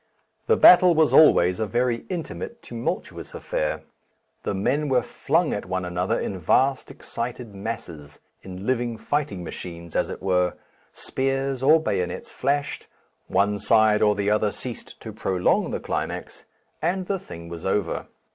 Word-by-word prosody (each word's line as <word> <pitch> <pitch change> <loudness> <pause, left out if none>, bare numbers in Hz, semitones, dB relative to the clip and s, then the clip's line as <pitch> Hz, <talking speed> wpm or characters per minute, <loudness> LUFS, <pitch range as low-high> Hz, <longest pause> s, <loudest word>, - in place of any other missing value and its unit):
The 455 - +4
battle 180 -1 +8
was 155 -1 +3
always 90 - +6
a 110 - 0
very 120 +1 0
intimate 185 +6 -5
tumultuous 115 -1 -5
affair, 75 - -2 0.6
the - - -2
men 140 +10 0
were 125 -2 +3
flung 165 -1 0
at 105 - -4
one 95 0 -2
another 90 +1 -1
in 95 - -4
vast 130 - +2
excited 120 -2 -6
masses, 95 -9 -7 0.2
in 95 +1 -8
living 120 -2 0
fighting 140 -10 -2
machines 85 -1 -8
as - - +1
it - - -7
were, 90 -2 +1 0.4
spears 135 0 -1
or 155 +4 +6
bayonets 90 - -3
flashed, 140 +2 -2 0.4
one 100 +2 +1
side 105 0 +4
or 105 -1 +4
the 100 0 0
other 105 -1 +2
ceased 125 +2 -7
to 110 - -8
prolong 95 -4 +1
the - - -3
climax, - - -4 0.4
and 180 +3 0
the 195 +1 -1
thing 85 - -10
was 85 0 -8
over. 100 +2 -1
110 Hz, 150 wpm, -24 LUFS, 95-135 Hz, 0.6 s, battle